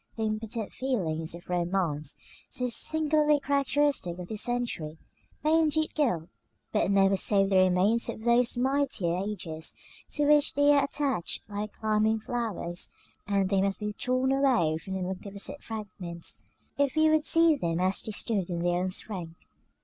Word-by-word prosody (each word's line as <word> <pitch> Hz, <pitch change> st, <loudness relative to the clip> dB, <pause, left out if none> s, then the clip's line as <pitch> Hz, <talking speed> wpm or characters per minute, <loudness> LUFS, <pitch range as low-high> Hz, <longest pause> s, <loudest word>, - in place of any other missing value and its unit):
The 225 Hz, -, -3 dB
impotent 220 Hz, 0 st, -3 dB
feelings 170 Hz, -12 st, -2 dB
of 170 Hz, -, -12 dB
romance, 175 Hz, -4 st, -1 dB, 0.3 s
so 250 Hz, 0 st, -2 dB
singularly 300 Hz, +3 st, +2 dB
characteristic 280 Hz, -8 st, +1 dB
of 180 Hz, -1 st, -8 dB
this 215 Hz, -2 st, -3 dB
century, 235 Hz, -11 st, -2 dB, 0.5 s
may 315 Hz, +2 st, +4 dB
indeed 315 Hz, 0 st, +1 dB
gild, 180 Hz, -, 0 dB, 0.4 s
but -, -, +1 dB
never 195 Hz, 0 st, +4 dB
save 195 Hz, 0 st, +2 dB
the 190 Hz, -, +4 dB
remains 185 Hz, +5 st, +3 dB
of 220 Hz, -, -6 dB
those 240 Hz, +1 st, +3 dB
mightier 260 Hz, -9 st, +1 dB
ages 180 Hz, -5 st, -5 dB, 0.4 s
to 295 Hz, -, +1 dB
which 295 Hz, 0 st, +4 dB
they 285 Hz, +1 st, +5 dB
are 285 Hz, -1 st, +5 dB
attached 275 Hz, -, -2 dB
like 210 Hz, 0 st, -5 dB
climbing 220 Hz, 0 st, +1 dB
flowers; 215 Hz, -7 st, -3 dB, 0.4 s
and 200 Hz, -2 st, +1 dB
they 195 Hz, -1 st, +2 dB
must 195 Hz, -1 st, 0 dB
be 210 Hz, 0 st, -3 dB
torn 255 Hz, +4 st, 0 dB
away 245 Hz, -, +2 dB
from 190 Hz, +3 st, -6 dB
the 190 Hz, -, -2 dB
magnificent 200 Hz, +9 st, -5 dB
fragments, 185 Hz, -6 st, -7 dB, 0.4 s
if 285 Hz, 0 st, +2 dB
we 315 Hz, 0 st, +4 dB
would 310 Hz, -1 st, +3 dB
see 330 Hz, 0 st, +4 dB
them 170 Hz, -, -1 dB
as 185 Hz, +1 st, +1 dB
they 220 Hz, -, -6 dB
stood 205 Hz, -3 st, -1 dB
in 170 Hz, -1 st, -2 dB
their 175 Hz, 0 st, +1 dB
own 185 Hz, +1 st, -1 dB
strength. 180 Hz, -4 st, -5 dB
210 Hz, 160 wpm, -28 LUFS, 180-270 Hz, 0.5 s, they